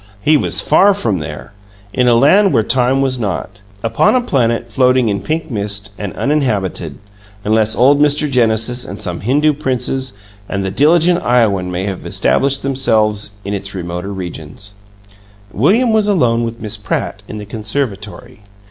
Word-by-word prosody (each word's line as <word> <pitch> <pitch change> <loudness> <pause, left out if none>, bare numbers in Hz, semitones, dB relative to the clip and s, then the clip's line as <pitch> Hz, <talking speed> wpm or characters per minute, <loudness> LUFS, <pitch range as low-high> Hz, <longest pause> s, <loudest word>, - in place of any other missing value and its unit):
He 155 +9 +3
was 145 - +2
far 200 0 +4
from 110 - -1
there, 75 - -8 0.4
in 125 -1 +1
a 120 - +5
land 190 - +4
where 115 - +3
time 130 +3 +1
was 130 -2 0
not. 100 -1 -4 0.2
Upon 115 - +2
a 255 - +3
planet 120 - -1
floating 125 0 +3
in 100 -1 -2
pink 160 -1 -3
mist, 105 -1 -3
and 100 -2 -5
uninhabited 105 - -1 0.5
unless 110 +1 +2
old 140 +4 +4
Mr. 150 0 +3
Genesis 120 -1 +1
and - - -8
some 85 -2 -4
Hindoo 145 +7 +2
princes 130 -2 -2 0.4
and 100 -1 -2
the 95 - -2
diligent 165 - +3
Iowan 105 -7 +2
may 90 +1 -3
have 95 -2 -5
established 140 0 +1
themselves 110 -6 +1
in 100 - -3
its 100 0 -4
remoter 90 +2 -5
regions 95 +1 -7 0.8
William 220 - +2
was 215 -1 +2
alone 125 - +2
with 115 0 -6
Miss 105 -2 -3
Pratt, - - -3
in 105 - -7
the 105 - -7
conservatory. 105 -1 -5
115 Hz, 160 wpm, -16 LUFS, 100-140 Hz, 0.8 s, a